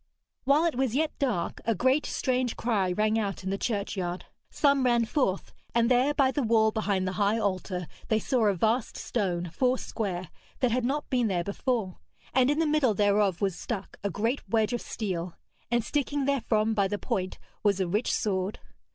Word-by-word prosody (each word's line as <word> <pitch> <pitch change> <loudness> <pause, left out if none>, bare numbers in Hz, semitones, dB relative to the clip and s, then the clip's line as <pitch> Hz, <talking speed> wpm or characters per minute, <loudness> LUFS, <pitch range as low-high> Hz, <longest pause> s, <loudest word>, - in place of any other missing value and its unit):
While 285 +5 +4
it 335 - +1
was 255 -2 0
yet 310 +2 +1
dark 245 - -1
a 230 - +1
great 260 +8 +2
strange 255 -2 -1
cry 205 -6 +1
rang 215 +4 +1
out 200 -3 -3
in 190 - -2
the 195 - -1
churchyard. 195 -5 -2 0.2
Some 280 -2 +3
ran 240 -2 +3
forth, 220 -6 -1 0.2
and 235 +1 +3
there 260 +4 +3
by 265 -2 +3
the 290 - -1
wall 220 -2 +3
behind 200 -4 0
the - - 0
high 205 +2 +3
altar 185 -3 -2 0.2
they 220 - +2
saw 230 0 +1
a 200 - +2
vast 220 +6 0
stone, 180 -6 -2
four 255 +3 +2
square, 185 -9 -4 0.3
that 250 -2 +2
had 245 +1 +1
not 290 +4 -1
been 245 -3 +2
there 180 -4 0
before, 200 -1 -2 0.3
and 260 0 +4
in 295 - +2
the 325 - +2
middle 295 -7 +2
thereof 205 -2 +2
was 195 -3 +1
stuck 200 -1 -5
a 200 - 0
great 225 +8 -1
wedge 225 0 +2
of 240 - -1
steel, 180 -5 -4 0.3
and 240 0 +1
sticking 285 0 -1
therefrom 225 -5 +1
by 200 -2 +2
the 205 +1 -2
point 185 -2 -3 0.2
was 200 -2 +2
a 190 - +1
rich 210 +7 0
sword. 195 -2 -1
220 Hz, 195 wpm, -28 LUFS, 195-255 Hz, 0.3 s, While